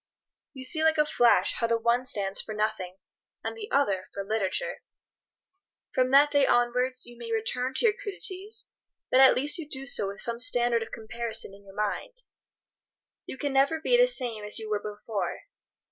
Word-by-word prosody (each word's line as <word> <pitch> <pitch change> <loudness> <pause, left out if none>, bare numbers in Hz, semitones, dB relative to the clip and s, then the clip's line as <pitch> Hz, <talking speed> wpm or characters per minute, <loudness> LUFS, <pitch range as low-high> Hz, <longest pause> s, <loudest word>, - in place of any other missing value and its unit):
You 260 -2 -8
see, 315 +5 +1
like 320 0 +3
a 300 - +4
flash, 240 -5 +3
how 230 - -1
the 230 0 +2
one 235 +2 +1
stands 195 -4 -1
for 215 - -7
nothing, 210 -4 -2 0.5
and - - -4
the 435 -1 -8
other 200 -10 +1
for 200 - -3
literature. 220 - -2 1.1
From 255 0 +2
that 285 +2 +6
day 285 -2 +4
onwards 250 +1 +1
you 240 - -13
may 230 -1 -7
return 250 +4 -1
to - - +1
your 430 - +5
crudities, 405 +1 -5 0.5
but 255 - +5
at 265 -1 +8
least 295 +6 +2
you 305 -3 -7
do 270 -1 -6
so 210 -6 +1
with 200 0 -7
some 235 0 0
standard 240 -1 +3
of 225 - -6
comparison 225 -2 -3
in 200 0 -15
your 195 0 -14
mind. - - -3 1.0
You - - -7
can 285 0 -2
never 280 +4 +3
be 485 +10 +2
the - - +6
same 245 - -2
as 210 - -4
you 220 -1 -6
were 205 -1 0
before. 210 0 -4
245 Hz, 190 wpm, -27 LUFS, 215-285 Hz, 1.1 s, at